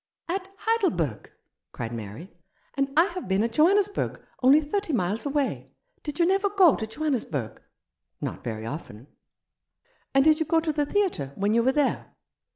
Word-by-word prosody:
"At 375 +2 -3
Heidelberg?" 195 - 0 0.4
cried 115 -1 -5
Mary. 115 - -8 0.4
"And 275 0 0
I 330 - +7
have 365 - -6
been 195 +2 +2
at 230 - -1
Johannesburg, 395 - +2 0.2
only 265 +4 +7
thirty 320 +3 -2
miles 215 +3 -1
away. 285 -1 -2 0.3
Did 295 +1 -6
you 340 - +5
never 390 +3 +2
go 380 -7 +5
to 220 - -4
Johannesburg? 220 - -3 0.2
" - - -61
" - - -56
Not - - -5
very 110 -3 -4
often." 115 -4 -7 1.1
"And 270 - +6
did 310 0 +5
you 320 - 0
go 330 - +3
to 320 -1 -1
the 295 -1 0
theatre 360 - 0
when 205 +2 +1
you 235 - +4
were 255 +3 +3
there 290 -1 -1
280 Hz, 170 wpm, -26 LUFS, -, 1.1 s, I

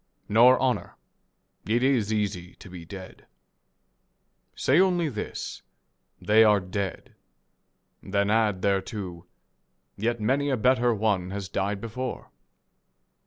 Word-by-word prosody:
Nor 120 +4 +6
honour. 130 -1 -1 0.7
It 120 +3 +1
is 125 -6 +2
easy 100 -4 -2
to 95 - -14
be 85 -2 -9
dead. 95 +1 -11 1.3
Say 140 +6 +3
only 180 -4 +2
this, 110 -6 -6 0.3
" - - -49
They 110 +1 +7
are 105 -2 +5
dead." 95 0 -5 0.9
Then 100 +1 0
add 105 -4 +1
thereto, 95 -3 -2 0.3
" - - -48
Yet 115 +2 -1
many 135 +6 +1
a 135 - +1
better 125 +1 +3
one 100 -4 0
has 100 0 -5
died 100 +1 -2
before." 125 +3 -6
105 Hz, 120 wpm, -26 LUFS, 95-120 Hz, 1.3 s, They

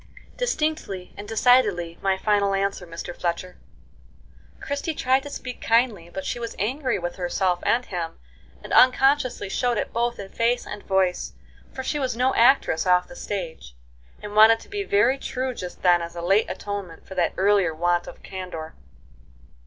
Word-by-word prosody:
"Distinctly 310 - -2
and 205 +1 -8
decidedly 210 -7 +3
my 195 -1 +1
final 200 -1 +2
answer, 195 -2 -2
Mr 170 +1 -7
Fletcher." 180 +1 -3 1.0
Christie 285 +2 -3
tried 260 0 +2
to 285 - -8
speak 255 -3 -7
kindly, 225 -7 +1
but 190 +2 -6
she - - -3
was 230 -1 -5
angry 255 +6 -1
with 175 -1 -5
herself 180 0 0
and 245 +2 +1
him, 170 -3 -5 0.5
and - - -6
unconsciously 255 -3 +4
showed 240 +4 0
it - - -3
both 235 +1 0
in 195 -1 -8
face 235 +3 0
and 210 - -7
voice, 190 -2 0 0.4
for 260 - -6
she 295 +3 -2
was 255 -4 -2
no 255 +2 +2
actress 230 -9 +3
off 180 0 +4
the 265 - -12
stage, 165 - -6 0.5
and 210 0 -7
wanted 220 +1 +7
to - - -15
be 410 0 -3
very 250 - +2
true 260 -1 -3
just 180 -6 -8
then 175 -1 +5
as 170 0 -7
a 170 - -5
late 195 +5 +3
atonement 200 -5 -6
for - - -9
that 180 -2 0
earlier 195 -3 +3
want 175 +1 +1
of - - -11
candor. 180 -4 -7
205 Hz, 170 wpm, -24 LUFS, 180-250 Hz, 1.0 s, wanted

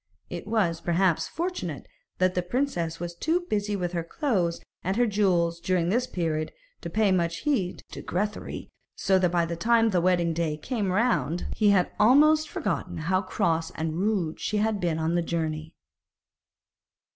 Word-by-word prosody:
It - - -6
was, 195 -7 +1
perhaps, 175 0 +1
fortunate 360 +3 -4 0.3
that 185 0 +2
the 180 - 0
princess 175 - -2
was 175 0 -4
too 320 - 0
busy 210 - -1
with 180 -3 -2
her 170 -2 -2
clothes 180 - -1 0.2
and 190 +4 -1
her 245 - +4
jewels 180 -6 +1
during 175 -1 0
this 245 +5 +1
period 160 -5 -2 0.3
to - - -5
pay 215 -2 +2
much 170 -2 0
heed 235 -12 -1
to - - -7
Grethari, 205 +4 -4 0.2
so 190 -1 +2
that 180 -1 +3
by 170 -1 +1
the 170 0 -3
time 225 +4 +3
the 180 -3 +2
wedding 175 -2 +2
day 160 -2 -1
came 205 - -2
round 190 - +1
he 210 -2 +3
had 190 -3 +3
almost 300 +7 +5
forgotten 195 -5 -3
how 185 +4 +1
cross 165 -3 0
and 160 +1 -2
rude 190 -6 0
she 215 - -1
had 215 0 +1
been 170 -4 0
on 160 +1 0
the 175 - +2
journey. 160 -2 -3
180 Hz, 170 wpm, -27 LUFS, 170-215 Hz, 0.3 s, almost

